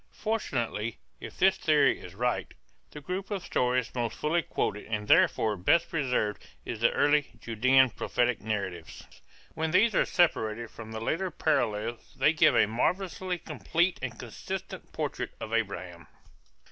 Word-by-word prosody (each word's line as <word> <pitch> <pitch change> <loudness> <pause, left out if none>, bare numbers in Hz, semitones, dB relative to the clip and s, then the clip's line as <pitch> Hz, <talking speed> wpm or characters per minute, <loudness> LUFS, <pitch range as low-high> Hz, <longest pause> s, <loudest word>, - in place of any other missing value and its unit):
Fortunately, 120 - -2 0.2
if - - -9
this 190 0 +4
theory 155 -3 +3
is 90 0 -11
right, 125 +3 -2 0.3
the 150 - -10
group 185 +5 -4
of 200 -4 -3
stories 125 -1 0
most 120 -2 -2
fully 165 +3 +1
quoted 105 -7 -3
and 105 -1 -3
therefore 110 0 +4
best 130 - +2
preserved 125 -9 -1 0.2
is 115 - -5
the 115 - +4
early 145 0 +3
Judean 130 +3 +3
prophetic 120 +2 0
narratives. 100 -6 -4 0.5
When 160 0 -1
these 205 +7 +4
are - - +3
separated 115 -10 +1
from 110 -1 -10
the 110 0 -5
later 185 +10 -1
parallels 120 -8 -1
they 145 +4 +4
give 155 - +4
a - - +5
marvelously 180 - -1
complete 165 - -1
and - - -5
consistent - - -7
portrait - - -4
of 110 - -6
Abraham. 95 -7 -3
125 Hz, 145 wpm, -29 LUFS, 110-165 Hz, 0.5 s, a